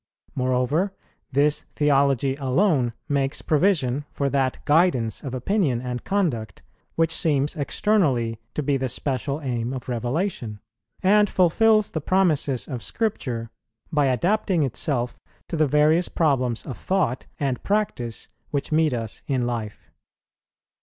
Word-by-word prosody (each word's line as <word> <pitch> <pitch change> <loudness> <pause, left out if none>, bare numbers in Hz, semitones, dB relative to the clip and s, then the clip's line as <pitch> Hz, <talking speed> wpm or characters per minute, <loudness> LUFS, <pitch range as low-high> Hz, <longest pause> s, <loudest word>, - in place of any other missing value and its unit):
Moreover, 130 +9 0 0.4
this 145 +2 +3
theology 140 -2 +2
alone 135 - +2
makes 140 -2 -1
provision 145 -5 +2
for 140 -1 -1
that 135 -2 +1
guidance 145 -8 +2
of 130 -3 -4
opinion 140 - +1
and 125 0 -5
conduct, 145 - -1 0.3
which 165 -1 +2
seems 150 -3 +2
externally 140 - +1 0.2
to 150 - -1
be 140 0 +1
the 130 -1 -2
special 140 +3 -2
aim 125 -2 -2
of 130 -2 -6
Revelation; 125 - -2 0.4
and 205 +2 +5
fulfils 215 +4 +3
the 160 - -3
promises 155 -7 +1
of 125 -5 -5
Scripture, 125 - -2 0.4
by 145 -3 +2
adapting 175 - +1
itself 125 -1 -2 0.3
to - - -2
the 155 -2 +3
various 150 +5 +3
problems 130 -7 0
of 130 - -7
thought 185 -10 -1
and 135 -3 -1
practice 200 - -2 0.2
which 140 +2 -3
meet 155 -2 +3
us 115 -2 -5
in 130 -3 0
life. 115 -4 -5
140 Hz, 130 wpm, -24 LUFS, 125-165 Hz, 0.4 s, and